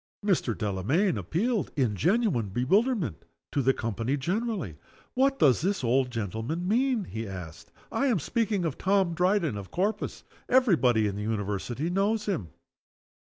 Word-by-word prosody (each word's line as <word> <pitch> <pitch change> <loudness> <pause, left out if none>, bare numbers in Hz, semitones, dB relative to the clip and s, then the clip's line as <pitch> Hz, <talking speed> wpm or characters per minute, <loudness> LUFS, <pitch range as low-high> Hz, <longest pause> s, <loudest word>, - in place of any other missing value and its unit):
Mr. 170 - +1
Delamayn 115 - +1
appealed, 185 - -1
in 125 -7 +1
genuine 175 - +1
bewilderment, 175 - +1 0.3
to 140 - +1
the 135 +1 +4
company 115 +3 -2
generally: 180 - -2 0.4
"What 270 +1 +2
does 135 - +4
this 195 -2 0
old 125 +2 +2
gentleman 115 - -3
mean?" 245 +1 +2
he 110 - -6
asked. 85 -3 -9 0.2
"I 280 - +1
am 240 -6 +3
speaking 205 - 0
of 155 -5 -3
Tom 190 -2 +2
Dryden, 180 - +1
of 100 -2 -7
Corpus. 200 +5 -2 0.3
Every 250 -7 +5
body 120 -7 +3
in 100 -1 -2
the - - -4
University 105 - -2
knows 205 +3 +1
_him. 175 - -2
155 Hz, 150 wpm, -28 LUFS, -, 0.4 s, Every